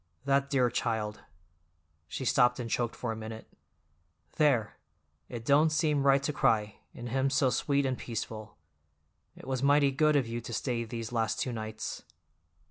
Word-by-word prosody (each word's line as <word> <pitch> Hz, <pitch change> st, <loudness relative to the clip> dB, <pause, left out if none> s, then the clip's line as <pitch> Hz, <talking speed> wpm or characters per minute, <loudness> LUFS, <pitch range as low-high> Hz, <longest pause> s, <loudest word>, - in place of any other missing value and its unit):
That 140 Hz, 0 st, +2 dB
dear 125 Hz, -4 st, +2 dB
child—" 110 Hz, -3 st, -2 dB, 0.9 s
she 130 Hz, -, -5 dB
stopped 125 Hz, 0 st, +3 dB
and 120 Hz, -, -3 dB
choked 120 Hz, 0 st, -1 dB
for 120 Hz, -, -3 dB
a -, -, -3 dB
minute. 110 Hz, 0 st, -8 dB, 0.9 s
"There! 135 Hz, -9 st, +2 dB, 0.5 s
It 115 Hz, -2 st, -7 dB
don't 150 Hz, +4 st, +5 dB
seem 155 Hz, -2 st, +1 dB
right 135 Hz, 0 st, +5 dB
to 150 Hz, -, -1 dB
cry, 105 Hz, -5 st, +1 dB, 0.2 s
and 120 Hz, 0 st, -6 dB
him 135 Hz, +2 st, +1 dB
so 135 Hz, -2 st, +2 dB
sweet 140 Hz, +3 st, +1 dB
and 130 Hz, -1 st, 0 dB
peaceful. 110 Hz, -2 st, -6 dB, 0.8 s
It -, -, -13 dB
was 130 Hz, -2 st, -2 dB
mighty 140 Hz, 0 st, +4 dB
good 150 Hz, +3 st, +3 dB
of 140 Hz, -3 st, +3 dB
you 115 Hz, +1 st, -4 dB
to 115 Hz, -, -7 dB
stay 120 Hz, 0 st, -1 dB
these 115 Hz, 0 st, -6 dB
last 115 Hz, -2 st, 0 dB
two 125 Hz, -, -1 dB
nights." 110 Hz, -1 st, -5 dB
125 Hz, 165 wpm, -30 LUFS, 115-140 Hz, 0.9 s, don't